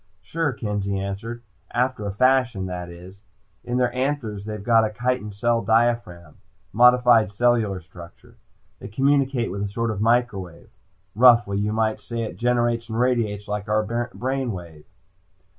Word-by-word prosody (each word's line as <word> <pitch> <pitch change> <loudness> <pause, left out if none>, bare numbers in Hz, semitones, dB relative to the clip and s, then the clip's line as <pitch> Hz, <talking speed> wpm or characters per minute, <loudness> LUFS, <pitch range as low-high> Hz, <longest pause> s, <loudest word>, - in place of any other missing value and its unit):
"Sure," 160 +9 -1
Kenzie 105 -4 -3
answered. 105 +5 -5 0.3
"After 125 -3 -1
a - - -2
fashion, 125 -2 +2
that 90 -1 -5
is. 90 +3 -13 0.4
In 120 0 -2
their 125 -1 +1
anthers 125 -6 -2
they've 105 -2 -6
got 115 0 +4
a 110 - 0
chitin 125 -1 -2
cell 115 +3 0
diaphragm. 110 -7 0 0.4
Modified 120 -2 +5
cellular 110 -3 +1
structure. 85 -1 -15 0.4
They - - -8
communicate 135 -1 +1
with 100 +1 -4
a 100 - -1
sort 115 +3 -2
of 105 -1 -4
microwave. 110 -7 -1 0.4
Roughly 115 -3 +5
you 105 +1 -1
might 110 0 0
say 115 -1 -4
it 110 - -6
generates 120 -1 0
and 110 +1 -3
radiates 115 -5 0
like 105 0 -4
our 110 +3 0
brain 130 +3 -2
wave. 85 -5 -9
115 Hz, 150 wpm, -23 LUFS, 100-120 Hz, 0.4 s, Modified